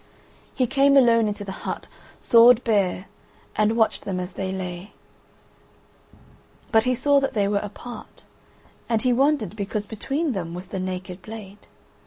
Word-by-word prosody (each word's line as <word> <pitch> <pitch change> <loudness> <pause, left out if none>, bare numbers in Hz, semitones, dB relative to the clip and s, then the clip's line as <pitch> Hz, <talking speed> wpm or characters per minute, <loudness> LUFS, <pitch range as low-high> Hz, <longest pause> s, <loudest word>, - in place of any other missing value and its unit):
He 255 - +2
came 275 +2 +4
alone 230 -4 +5
into 205 0 -4
the 195 - -5
hut, - - -5 0.3
sword 235 +1 +6
bare, 200 -4 +1 0.5
and 215 +2 +2
watched 220 -1 +2
them 185 -2 -4
as 180 +1 -5
they 190 +1 -4
lay: 185 0 -6 1.8
but 220 -1 +4
he 255 0 +2
saw 285 +3 +3
that 275 -2 -2
they 200 -2 +2
were 200 0 +1
apart, 215 +4 -10 0.7
and 225 -2 +1
he 250 -1 +3
wondered 265 - +1
because 210 0 -3
between 275 +9 -2
them 175 -6 -4
was 180 +1 -8
the 190 - -4
naked 185 0 -5
blade. 210 -2 -11
215 Hz, 155 wpm, -23 LUFS, 190-245 Hz, 1.8 s, sword